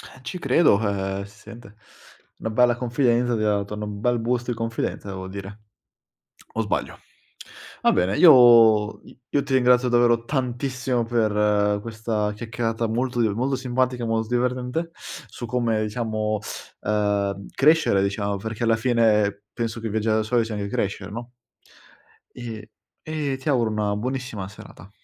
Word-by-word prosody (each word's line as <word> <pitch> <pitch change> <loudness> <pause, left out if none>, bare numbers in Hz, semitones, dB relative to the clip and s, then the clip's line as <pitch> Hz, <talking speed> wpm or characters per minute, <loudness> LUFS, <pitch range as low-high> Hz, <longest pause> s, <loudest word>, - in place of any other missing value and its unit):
Eh, - - -14
ci 130 +8 -5
credo, 165 - +3
eh 100 -2 -2
si 100 +1 -18
sente, 115 -1 -13 0.6
una 110 - -4
bella 120 +2 +3
confidenza, 120 -1 +1
ti 110 - -2
ha 105 -1 +2
dato 100 +1 -4
n 105 - -6
un 105 -1 -5
bel 120 +2 +1
boost 120 +1 -1
di 120 - 0
confidenza 115 -2 -3
devo 95 -1 -6
dire. 100 +2 -8 0.9
O 110 - 0
sbaglio? 105 - -3 0.8
Va - - +4
bene, 95 +3 +1
io 115 -8 +7 0.3
io 145 - +1
ti - - -6
ringrazio 125 -1 +4
davvero 120 -1 +3
tantissimo 125 -1 -1
per 105 -3 +1
questa 110 -1 -2
chiacchierata 115 +1 -2
molto 120 +2 -1
di 115 - +3
molto 130 +6 -1
simpatica 125 -1 -1
e - - -3
molto 115 -1 -1
divertente 125 +6 -1
su - - -10
come, 115 -2 0
diciamo, 110 -1 -2 0.4
ehm, 100 -2 -1
crescere, 150 -9 +4
diciamo, 100 0 -1
perché 110 +3 -6
alla 115 -1 +3
fine 110 -4 +2
penso 115 -1 -3
che 115 -1 -4
viaggiare 110 +1 +1
da - - +1
soli 115 +2 +1
sia 110 -1 -5
anche 100 -1 -3
crescere, 100 0 -3
no? 120 +3 -7 1.0
E 115 -3 -8 0.3
e 150 -3 -3
ti 135 +3 -5
auguro 120 -5 +2
una 105 -1 -1
buonissima 125 -3 -4
serata. 100 -1 -14
115 Hz, 155 wpm, -23 LUFS, 105-125 Hz, 1.0 s, io